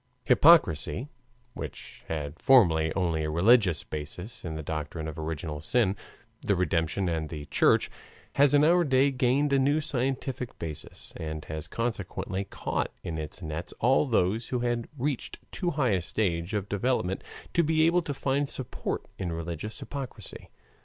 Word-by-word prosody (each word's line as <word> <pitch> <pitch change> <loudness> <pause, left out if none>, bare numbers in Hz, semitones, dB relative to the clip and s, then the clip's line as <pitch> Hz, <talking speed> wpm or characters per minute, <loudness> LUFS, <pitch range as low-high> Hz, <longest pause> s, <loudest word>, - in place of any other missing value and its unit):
Hypocrisy, 145 - +4 0.4
which - - -8
had 75 0 -4
formerly 80 -12 +5
only 85 -4 0
a 75 - -1
religious 90 +1 +4
basis 80 +8 -6
in 80 -2 -4
the 80 - -5
doctrine 80 +1 -4
of 80 +1 -6
original 80 -1 -4
sin, 100 +2 +2 0.5
the 100 - +1
redemption, 90 +1 0
and 80 -2 -1
the 75 -3 -6
Church, - - +3 0.4
has 145 0 +5
in 145 - +5
our 175 +3 +5
day 135 -1 +3
gained 135 +3 +2
a 135 - +4
new 145 +3 +3
scientific 130 -2 -2
basis 80 -2 -7
and 80 -1 -5
has 80 0 -5
consequently 100 -2 -3
caught - - -2
in 80 -1 -4
its 75 +4 -7
nets 80 +2 -5
all 130 +5 +3
those 110 -1 +1
who 125 -2 -1
had 120 -1 -1
reached 135 0 -2
too 180 - -1
high 140 -7 +1
a 95 -2 +2
stage 85 0 -1
of 100 -1 -2
development 100 -3 0 0.3
to 170 - +4
be 160 0 +3
able 175 +2 +4
to 150 -3 -4
find 140 +1 0
support 130 - -4
in 90 -3 -2
religious 85 +5 -4
hypocrisy. 140 -3 -7
100 Hz, 160 wpm, -28 LUFS, 80-130 Hz, 0.5 s, formerly